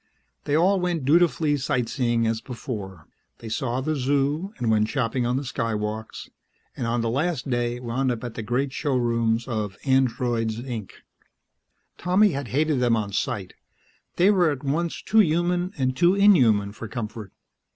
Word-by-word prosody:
They 145 Hz, -, +1 dB
all 190 Hz, +4 st, +3 dB
went 175 Hz, -6 st, -1 dB
dutifully 155 Hz, -1 st, +3 dB
sight 130 Hz, -3 st, -1 dB
seeing 120 Hz, -3 st, 0 dB
as 110 Hz, 0 st, -1 dB
before; 105 Hz, -, -7 dB, 0.3 s
they 115 Hz, -, -9 dB
saw 120 Hz, +3 st, -2 dB
the 155 Hz, +3 st, -1 dB
Zoo, 145 Hz, +7 st, 0 dB
and 115 Hz, -2 st, 0 dB
went 110 Hz, -1 st, +3 dB
shopping 125 Hz, -2 st, -1 dB
on 125 Hz, +1 st, 0 dB
the 140 Hz, -, -2 dB
Skywalks, 110 Hz, -4 st, -4 dB, 0.5 s
and 120 Hz, -, -3 dB
on 120 Hz, 0 st, 0 dB
the 115 Hz, -, -1 dB
last 145 Hz, 0 st, -1 dB
day 120 Hz, 0 st, -1 dB
wound 125 Hz, +2 st, -1 dB
up 120 Hz, 0 st, -4 dB
at 120 Hz, -2 st, -5 dB
the 115 Hz, -, -5 dB
great 125 Hz, +5 st, -1 dB
showrooms 120 Hz, -4 st, 0 dB
of 105 Hz, -5 st, -3 dB
"Androids, 120 Hz, -4 st, +1 dB
Inc." 120 Hz, -5 st, -5 dB, 1.1 s
Tommy 190 Hz, +3 st, +3 dB
had 140 Hz, -3 st, -4 dB
hated 150 Hz, +2 st, +1 dB
them 120 Hz, -2 st, +3 dB
on 105 Hz, -2 st, -3 dB
sight; -, -, -2 dB, 0.6 s
they 185 Hz, +4 st, +5 dB
were 180 Hz, -5 st, +3 dB
at 145 Hz, -2 st, -4 dB
once 160 Hz, +5 st, -2 dB
too 220 Hz, -, +3 dB
human 175 Hz, 0 st, +2 dB
and 130 Hz, -1 st, 0 dB
too 175 Hz, +5 st, +4 dB
inhuman 125 Hz, -, +4 dB
for 110 Hz, +2 st, -8 dB
comfort. 110 Hz, -2 st, -6 dB
125 Hz, 165 wpm, -24 LUFS, 115-150 Hz, 1.1 s, they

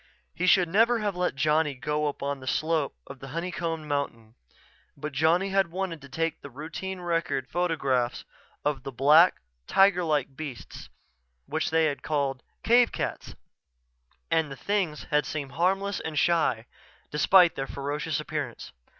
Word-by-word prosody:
He 180 Hz, -, -1 dB
should 180 Hz, -1 st, +5 dB
never 225 Hz, +7 st, +3 dB
have 205 Hz, -3 st, -2 dB
let 180 Hz, -4 st, -1 dB
Johnny 150 Hz, 0 st, +2 dB
go 150 Hz, +5 st, -1 dB
alone 140 Hz, 0 st, -3 dB
up -, -, -16 dB
the 130 Hz, -, -10 dB
slope 155 Hz, 0 st, 0 dB
of 140 Hz, -1 st, -11 dB
the 135 Hz, -, -9 dB
honey 170 Hz, +6 st, -4 dB
combed 165 Hz, -2 st, -3 dB
mountain 140 Hz, -7 st, -3 dB, 0.6 s
but 150 Hz, +2 st, -5 dB
Johnny 165 Hz, +7 st, +2 dB
had 195 Hz, -1 st, +2 dB
wanted 175 Hz, -3 st, -4 dB
to 140 Hz, -, -13 dB
take 165 Hz, +3 st, -2 dB
the 140 Hz, -, -9 dB
routine 165 Hz, +7 st, -6 dB
record 165 Hz, -6 st, -1 dB
photographs 135 Hz, -7 st, 0 dB, 0.4 s
of 145 Hz, -1 st, 0 dB
the 135 Hz, -, -6 dB
black, 150 Hz, +7 st, +5 dB, 0.3 s
tiger 195 Hz, -2 st, +4 dB
like 145 Hz, -4 st, 0 dB
beasts 140 Hz, -5 st, -8 dB, 0.6 s
which -, -, -1 dB
they 160 Hz, 0 st, +3 dB
had 145 Hz, -2 st, -1 dB
called 140 Hz, -4 st, -1 dB, 0.2 s
cave 240 Hz, +1 st, +5 dB
cats -, -, -4 dB, 1.0 s
and 160 Hz, -3 st, +2 dB
the -, -, -5 dB
things 175 Hz, 0 st, -1 dB
had 150 Hz, 0 st, +2 dB
seemed 145 Hz, -3 st, -4 dB
harmless 190 Hz, +6 st, 0 dB
and 155 Hz, -2 st, -5 dB
shy, 155 Hz, -8 st, +2 dB, 0.5 s
despite 175 Hz, +3 st, +5 dB
their 135 Hz, 0 st, -4 dB
ferocious 145 Hz, +3 st, -3 dB
appearance. 150 Hz, -5 st, -5 dB
155 Hz, 160 wpm, -27 LUFS, 140-175 Hz, 1.0 s, should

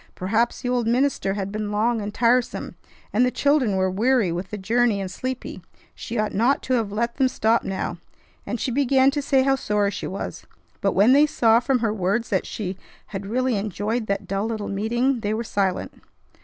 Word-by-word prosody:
Perhaps 225 Hz, +6 st, 0 dB
the 250 Hz, -, -2 dB
old 245 Hz, -2 st, 0 dB
minister 240 Hz, -5 st, +1 dB
had 200 Hz, -1 st, -3 dB
been 210 Hz, 0 st, -3 dB
long 225 Hz, +2 st, +1 dB
and 205 Hz, 0 st, -4 dB
tiresome, 240 Hz, +2 st, +1 dB, 0.4 s
and 230 Hz, +4 st, +4 dB
the 250 Hz, -, +3 dB
children 275 Hz, -6 st, +2 dB
were 190 Hz, 0 st, +2 dB
weary 225 Hz, -1 st, +2 dB
with 180 Hz, +2 st, -4 dB
the 210 Hz, -, -5 dB
journey 225 Hz, +2 st, +1 dB
and 190 Hz, -2 st, -4 dB
sleepy; 255 Hz, +5 st, -5 dB, 0.3 s
she 240 Hz, -, -6 dB
ought 215 Hz, 0 st, 0 dB
not 240 Hz, +7 st, +2 dB
to 260 Hz, -, -1 dB
have 225 Hz, -5 st, 0 dB
let 235 Hz, +3 st, -2 dB
them 265 Hz, -1 st, +4 dB
stop 230 Hz, -2 st, +1 dB
now; 190 Hz, -2 st, -3 dB, 0.4 s
and 245 Hz, -, -4 dB
she 255 Hz, -, -1 dB
began 270 Hz, +1 st, +3 dB
to 290 Hz, +1 st, -2 dB
say 270 Hz, -1 st, +2 dB
how 270 Hz, 0 st, +3 dB
sorry 210 Hz, -5 st, 0 dB
she -, -, -5 dB
was. 195 Hz, -, -6 dB, 0.3 s
But, 195 Hz, -, +1 dB
when 210 Hz, +7 st, +5 dB
they 290 Hz, +2 st, +6 dB
saw 230 Hz, -6 st, +4 dB
from 250 Hz, +1 st, +1 dB
her 225 Hz, -3 st, +1 dB
words 210 Hz, +4 st, -1 dB
that -, -, 0 dB
she 190 Hz, -3 st, -5 dB, 0.4 s
had 195 Hz, 0 st, -4 dB
really 255 Hz, +2 st, 0 dB
enjoyed 210 Hz, +3 st, -2 dB
that 200 Hz, -, -2 dB
dull 195 Hz, +2 st, -1 dB
little 220 Hz, -2 st, -4 dB
meeting, 235 Hz, +6 st, 0 dB
they 215 Hz, 0 st, -1 dB
were 230 Hz, -, -2 dB
silent. 195 Hz, -4 st, -1 dB
225 Hz, 205 wpm, -23 LUFS, 200-250 Hz, 0.4 s, they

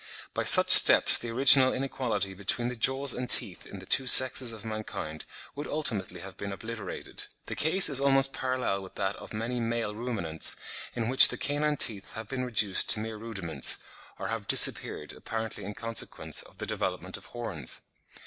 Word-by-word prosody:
By -, -, -5 dB
such -, -, +8 dB
steps -, -, +9 dB
the 120 Hz, -, -8 dB
original 130 Hz, +2 st, +4 dB
inequality 115 Hz, -7 st, -5 dB
between 100 Hz, +5 st, -3 dB
the 125 Hz, -, -8 dB
jaws 135 Hz, +3 st, 0 dB
and 125 Hz, 0 st, -8 dB
teeth 105 Hz, -8 st, +1 dB
in 100 Hz, -, -12 dB
the 95 Hz, -, -14 dB
two 130 Hz, +6 st, 0 dB
sexes 130 Hz, -1 st, +6 dB
of 110 Hz, -1 st, -11 dB
mankind 110 Hz, -8 st, -8 dB, 0.3 s
would 145 Hz, -, -9 dB
ultimately 105 Hz, -, -5 dB
have 95 Hz, 0 st, -13 dB
been 100 Hz, 0 st, -8 dB
obliterated. 110 Hz, 0 st, -6 dB, 0.2 s
The -, -, -8 dB
case 170 Hz, +5 st, +1 dB
is 140 Hz, -2 st, 0 dB
almost 135 Hz, -1 st, +3 dB
parallel 130 Hz, -6 st, -5 dB
with 95 Hz, -, -15 dB
that 95 Hz, +1 st, -5 dB
of -, -, -14 dB
many 115 Hz, +3 st, -6 dB
male 115 Hz, -2 st, -5 dB
Ruminants, 105 Hz, -9 st, -3 dB, 0.4 s
in 115 Hz, -2 st, -5 dB
which 130 Hz, +2 st, +5 dB
the -, -, -8 dB
canine 150 Hz, +1 st, -3 dB
teeth 105 Hz, -6 st, -1 dB
have 110 Hz, -1 st, -10 dB
been 130 Hz, +1 st, -7 dB
reduced 105 Hz, -6 st, -1 dB
to 110 Hz, -, +3 dB
mere 110 Hz, 0 st, -8 dB
rudiments, 95 Hz, -, -4 dB, 0.4 s
or -, -, -8 dB
have -, -, -7 dB
disappeared, -, -, +1 dB
apparently 110 Hz, -1 st, -8 dB
in 105 Hz, +1 st, -10 dB
consequence 115 Hz, 0 st, -3 dB
of -, -, -19 dB
the -, -, -8 dB
development -, -, -6 dB
of -, -, -8 dB
horns. 110 Hz, -10 st, -8 dB
115 Hz, 180 wpm, -25 LUFS, 100-130 Hz, 0.4 s, steps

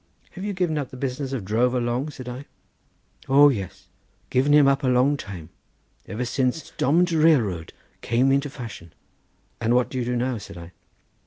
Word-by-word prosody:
"Have 185 Hz, -, -8 dB
you 205 Hz, 0 st, -2 dB
given 175 Hz, -5 st, 0 dB
up 140 Hz, -, -4 dB
the 130 Hz, -, -10 dB
business 135 Hz, +1 st, -3 dB
of 125 Hz, -8 st, -4 dB
drover 120 Hz, +5 st, +1 dB
long?" 120 Hz, +4 st, -1 dB
said 130 Hz, -4 st, -10 dB
I. 125 Hz, +3 st, -7 dB, 0.8 s
"O 145 Hz, +2 st, +7 dB
yes; 100 Hz, -9 st, -5 dB, 0.4 s
given 135 Hz, +3 st, +2 dB
him 145 Hz, -1 st, +6 dB
up 140 Hz, +1 st, +2 dB
a -, -, +1 dB
long 130 Hz, +3 st, +3 dB
time 90 Hz, -, -8 dB, 0.6 s
ever 110 Hz, +6 st, -3 dB
since 130 Hz, +4 st, -1 dB
domm'd 170 Hz, +6 st, +2 dB
railroad 130 Hz, -, +2 dB, 0.3 s
came 125 Hz, +3 st, +2 dB
into 140 Hz, +1 st, +1 dB
fashion." 115 Hz, -, -9 dB, 0.7 s
"And 120 Hz, +1 st, +1 dB
what 125 Hz, 0 st, +1 dB
do 130 Hz, -, -3 dB
you 120 Hz, -, -2 dB
do 125 Hz, 0 st, -1 dB
now?" 125 Hz, -1 st, -1 dB
said 95 Hz, -, -11 dB
I. 85 Hz, 0 st, -10 dB
130 Hz, 180 wpm, -24 LUFS, 120-145 Hz, 0.8 s, O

